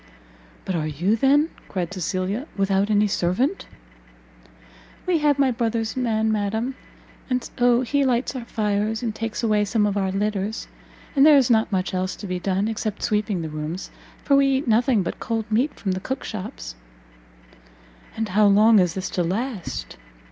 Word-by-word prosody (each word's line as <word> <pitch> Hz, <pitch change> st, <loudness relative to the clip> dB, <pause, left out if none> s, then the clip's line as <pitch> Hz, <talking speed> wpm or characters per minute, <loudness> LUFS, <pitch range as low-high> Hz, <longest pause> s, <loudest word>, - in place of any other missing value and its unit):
"But 190 Hz, -, -2 dB
are 155 Hz, -3 st, -1 dB
you, 175 Hz, +8 st, +1 dB
then," 285 Hz, +6 st, +3 dB, 0.2 s
cried 180 Hz, -1 st, -3 dB
Cecilia, 185 Hz, -, -2 dB
"without 195 Hz, +1 st, +1 dB
any 210 Hz, 0 st, +3 dB
servant?" 205 Hz, -, 0 dB, 1.4 s
"We 355 Hz, -3 st, +2 dB
have 295 Hz, -2 st, +2 dB
my 275 Hz, -2 st, +3 dB
brother's 230 Hz, -1 st, -1 dB
man, 220 Hz, -3 st, +1 dB
madam, 220 Hz, +4 st, -1 dB, 0.6 s
and 255 Hz, -1 st, -1 dB
so 245 Hz, 0 st, +4 dB
he 280 Hz, +3 st, +1 dB
lights 255 Hz, 0 st, 0 dB
our 245 Hz, -2 st, -5 dB
fires, 215 Hz, +1 st, -1 dB
and 225 Hz, -2 st, -1 dB
takes 225 Hz, +1 st, -4 dB
away 215 Hz, -2 st, +2 dB
some 210 Hz, +1 st, +1 dB
of 205 Hz, -1 st, 0 dB
our 190 Hz, -1 st, 0 dB
litters; 205 Hz, +1 st, -2 dB, 0.5 s
and 275 Hz, -, +5 dB
there 300 Hz, -1 st, +8 dB
is 255 Hz, -3 st, +3 dB
not 220 Hz, -1 st, +3 dB
much 185 Hz, -1 st, -1 dB
else 185 Hz, 0 st, -1 dB
to -, -, -9 dB
be 180 Hz, -2 st, -3 dB
done, 195 Hz, +2 st, 0 dB
except 215 Hz, -1 st, -3 dB
sweeping 210 Hz, -5 st, 0 dB
the 160 Hz, -, -4 dB
rooms, 155 Hz, +4 st, -5 dB, 0.3 s
for 280 Hz, -, +3 dB
we 275 Hz, 0 st, +5 dB
eat 270 Hz, 0 st, 0 dB
nothing 230 Hz, -1 st, +3 dB
but -, -, -5 dB
cold 225 Hz, -2 st, -2 dB
meat 250 Hz, +7 st, +1 dB
from 195 Hz, -, -1 dB
the 185 Hz, -, -2 dB
cook 265 Hz, +7 st, -4 dB
shops." 185 Hz, -, -6 dB, 1.4 s
"And 220 Hz, -1 st, -2 dB
how 205 Hz, +3 st, +4 dB
long 210 Hz, +2 st, +6 dB
is 180 Hz, -2 st, +1 dB
this 190 Hz, -1 st, -4 dB
to 180 Hz, -, 0 dB
last?" 185 Hz, -, -4 dB
215 Hz, 175 wpm, -23 LUFS, 190-245 Hz, 1.4 s, there